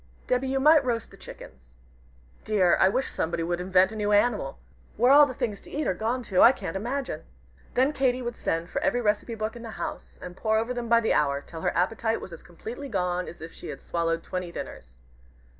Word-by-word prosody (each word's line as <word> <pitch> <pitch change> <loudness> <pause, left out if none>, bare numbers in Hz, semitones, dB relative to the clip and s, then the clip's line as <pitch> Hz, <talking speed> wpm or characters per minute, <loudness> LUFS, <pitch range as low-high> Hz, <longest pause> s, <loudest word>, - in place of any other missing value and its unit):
Debby, 250 +1 0
you 270 +1 0
might 305 +2 +6
roast 235 -4 -2
the - - -13
chickens. 65 -1 -13 0.7
Dear! 195 -5 +3
I - - +6
wish 260 +7 0
somebody 165 +1 -2
would 175 +1 -2
invent 185 +1 +3
a - - -7
new 210 -1 -1
animal! 205 - +2 0.4
Where 245 +4 +5
all 290 +1 +8
the 255 - -5
things 210 -4 -3
to - - -14
eat 300 +1 -2
are - - +1
gone 230 +6 -2
to, 190 -5 +2
I 240 - +9
can't 165 - -6
imagine!" 240 - -3 0.5
Then 265 +4 +3
Katy 255 -2 +1
would 240 0 -4
send 165 +1 -2
for - - -2
every 245 - +1
recipe 215 +1 0
book 215 +1 -3
in 235 - -9
the 230 - -7
house, - - -6
and 180 - -9
pore 220 +2 +1
over 230 +3 -1
them 240 -1 -4
by 235 0 +5
the 225 - +1
hour, 140 -1 +2
till 160 +3 -10
her - - -1
appetite 225 +5 0
was 180 - -9
as 165 - -10
completely 235 +10 -8
gone 180 -4 -1
as 170 - -10
if 165 +1 -8
she - - -10
had - - -6
swallowed 165 -1 -1
twenty 180 -1 -4
dinners. - - -8
215 Hz, 225 wpm, -26 LUFS, 175-245 Hz, 0.7 s, I